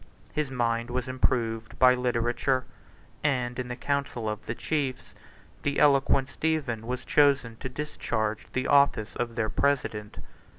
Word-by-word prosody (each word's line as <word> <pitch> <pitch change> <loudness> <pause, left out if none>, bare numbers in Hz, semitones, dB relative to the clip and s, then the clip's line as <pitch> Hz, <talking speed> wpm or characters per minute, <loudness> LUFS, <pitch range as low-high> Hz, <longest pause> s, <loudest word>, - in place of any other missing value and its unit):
His 150 -3 -1
mind 120 -2 0
was 125 0 -2
improved 115 -3 -1
by 130 0 +7
literature; 125 +1 0 0.6
and, 125 -4 0
in 125 - -3
the 125 - -4
council 140 -4 -2
of 105 0 -4
the 115 - -2
chiefs, 140 -3 -2 0.5
the 145 0 -1
eloquent 140 -2 +4
Stephen 150 -7 -1
48 115 - -12
was 125 0 -3
chosen 135 -5 +3
to 130 - -5
discharge 110 -6 -3
the 130 0 -1
office 140 -7 +3
of 115 -1 -3
their 110 -2 0
president. 110 -7 -1
125 Hz, 145 wpm, -27 LUFS, 115-140 Hz, 0.6 s, by